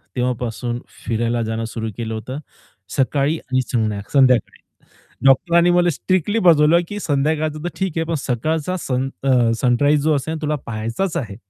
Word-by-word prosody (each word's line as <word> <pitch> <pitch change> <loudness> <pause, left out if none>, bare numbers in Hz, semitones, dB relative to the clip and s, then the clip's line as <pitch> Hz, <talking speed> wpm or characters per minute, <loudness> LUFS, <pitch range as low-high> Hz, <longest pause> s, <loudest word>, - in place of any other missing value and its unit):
तेव्हापासून 120 -1 -2 0.3
फिरायला 115 +1 0
जाणं 110 +1 -3
सुरु 110 -1 -4
केलं 115 -1 -4
होतं. 130 +6 -5 0.6
सकाळी 140 +3 +1
आणि 130 -3 -1
संध्या 110 -5 -1
संध्याकाळी 130 -3 +3 0.7
डॉक्टरांनी 170 +6 +4
मला 175 0 +3
स्ट्रिक्टली 185 +7 0
बजवलं, 165 -3 +5
की 205 - -5
संध्याकाळचं 155 +1 0
तर - - 0
ठीक 190 -3 -1
आहे, 165 - +1
पण 165 - -2
सकाळचा 155 +8 -1
सन 130 0 -1
अ, 125 -4 +3
सनराईज 145 +4 +3
जो 155 0 +2
असेल 155 +4 -3
तुला 150 0 0
पहायचाच 115 - -3
आहे. 105 -6 -4
135 Hz, 150 wpm, -20 LUFS, 120-160 Hz, 0.7 s, बजवलं